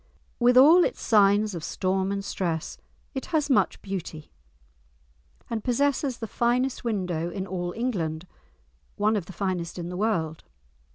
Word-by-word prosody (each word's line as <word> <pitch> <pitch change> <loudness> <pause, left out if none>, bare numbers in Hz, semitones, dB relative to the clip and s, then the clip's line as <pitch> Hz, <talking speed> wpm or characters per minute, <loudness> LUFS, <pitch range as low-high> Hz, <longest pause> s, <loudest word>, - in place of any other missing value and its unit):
With 245 +1 +4
all 320 +7 +8
its - - -1
signs 205 -1 +3
of 170 -3 -6
storm 190 +3 -1
and 200 0 -3
stress 170 -5 -3 0.3
it 265 - -5
has 300 -4 0
much 260 - +2
beauty, 175 -5 -6 1.2
and 225 -2 -3
possesses 270 0 0
the 225 - -5
finest 240 +4 0
window 180 -7 -2
in 190 +1 -4
all 175 -2 -3
England, 175 -9 -2 0.7
one 215 +2 +2
of 190 -5 -3
the - - -8
finest 180 -4 -3
in 175 -1 -5
the 180 - -5
world. 170 -7 -1
200 Hz, 150 wpm, -26 LUFS, 175-240 Hz, 1.2 s, all